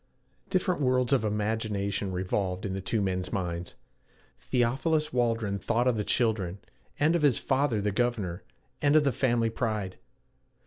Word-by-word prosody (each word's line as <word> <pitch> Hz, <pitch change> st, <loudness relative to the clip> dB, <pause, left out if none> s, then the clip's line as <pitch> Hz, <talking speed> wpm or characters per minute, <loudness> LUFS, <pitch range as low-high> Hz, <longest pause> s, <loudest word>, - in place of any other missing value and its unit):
Different 185 Hz, -4 st, +1 dB
worlds 125 Hz, -1 st, +2 dB
of 130 Hz, -, +3 dB
imagination 105 Hz, -2 st, -1 dB
revolved 95 Hz, +1 st, -2 dB
in 95 Hz, -, -2 dB
the 95 Hz, -, -3 dB
two 105 Hz, +2 st, 0 dB
men's 90 Hz, -1 st, -2 dB
minds. 85 Hz, -2 st, -3 dB, 0.6 s
Theophilus 135 Hz, +6 st, 0 dB
Waldron 115 Hz, -5 st, 0 dB
thought 120 Hz, +5 st, +1 dB
of 125 Hz, -, +3 dB
the 105 Hz, -, -1 dB
children, 105 Hz, -6 st, 0 dB, 0.4 s
and 155 Hz, +3 st, +3 dB
of 170 Hz, -, +1 dB
his 145 Hz, -5 st, +4 dB
father 135 Hz, -4 st, +1 dB
the 105 Hz, +1 st, 0 dB
governor, 100 Hz, -5 st, -1 dB, 0.4 s
and 145 Hz, +1 st, +3 dB
of 155 Hz, -, +6 dB
the 140 Hz, -, +2 dB
family 120 Hz, -2 st, +1 dB
pride. 110 Hz, -5 st, -2 dB
110 Hz, 150 wpm, -28 LUFS, 100-130 Hz, 0.6 s, of